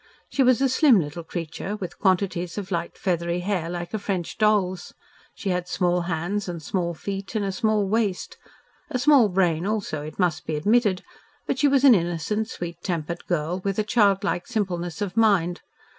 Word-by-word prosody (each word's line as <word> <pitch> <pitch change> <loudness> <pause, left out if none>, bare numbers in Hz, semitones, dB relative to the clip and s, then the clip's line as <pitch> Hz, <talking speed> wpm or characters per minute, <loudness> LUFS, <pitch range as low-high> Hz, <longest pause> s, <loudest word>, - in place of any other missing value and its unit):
She 275 - 0
was 255 0 +4
a 270 - +4
slim 260 -3 +5
little 160 +1 -4
creature, 170 +4 -5
with 190 -4 -7
quantities 185 -2 0
of 200 -1 -5
light 170 -1 -3
feathery 170 -1 -1
hair 180 -3 -1
like 175 +1 -5
a 220 - -1
French 190 -4 -3
doll's. 195 -4 +1 0.4
She 200 - -4
had 180 -1 -1
small 180 -1 +1
hands 180 +5 -2
and 170 -1 -4
small 170 +2 -2
feet 195 +4 -6
and 210 -2 0
a 195 - -1
small 215 -1 +1
waist 205 -3 -1 0.5
a 275 - -1
small 255 -4 +5
brain 175 -3 +1
also, 205 -8 -2
it 155 +1 -8
must 180 -4 0
be 155 - -1
admitted, 205 +3 +2 0.4
but 260 - -2
she 295 - +4
was 275 -1 +3
an 270 -3 +9
innocent, 185 +4 -1
sweet 170 -1 -6
tempered 170 -2 -4
girl 175 +2 -1
with 195 -1 -1
a 215 - +2
childlike 200 -4 +2
simpleness 185 -5 -2
of 195 -1 -5
mind. 195 -6 +2
185 Hz, 185 wpm, -24 LUFS, 175-210 Hz, 0.5 s, an